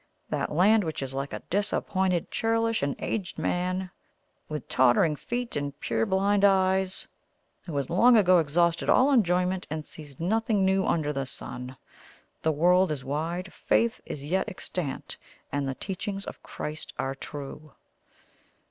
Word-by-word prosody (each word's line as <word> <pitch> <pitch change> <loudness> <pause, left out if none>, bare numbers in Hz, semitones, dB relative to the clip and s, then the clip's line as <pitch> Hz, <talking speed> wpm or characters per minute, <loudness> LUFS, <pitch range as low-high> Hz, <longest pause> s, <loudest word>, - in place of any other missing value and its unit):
that - - -1
land 205 +7 +4
which 160 -4 -3
is 135 0 -5
like 135 +1 -3
a - - -6
disappointed, 190 -2 0
churlish, 225 0 +1
and 140 0 0
aged 195 -6 -3
man 185 +1 -1 0.6
with 150 -1 -5
tottering 130 +5 +4
feet 240 +9 -4
and 145 0 -3
purblind 190 - +1
eyes, 190 -1 +3 0.6
who 165 - -5
has 140 -1 0
long 230 +8 +5
ago 185 -4 +6
exhausted 170 +2 +1
all 265 +3 +5
enjoyment 180 -5 +2
and 155 0 -4
sees 145 -4 -10
nothing 210 +2 +1
new 190 0 +3
under 150 -3 +1
the 135 -1 -2
sun. 125 0 -7 0.6
The 160 - +2
world 180 +5 +4
is 140 -4 -4
wide 165 +6 -3
faith 235 +1 +1
is 140 -1 -6
yet 185 +5 0
extant 180 -5 -4 0.3
and 140 -1 -1
the 135 - -2
teachings 195 +3 -4
of - - -8
Christ 155 +1 -6
are 135 0 -1
true. 145 +2 -8
175 Hz, 150 wpm, -27 LUFS, 145-195 Hz, 0.6 s, ago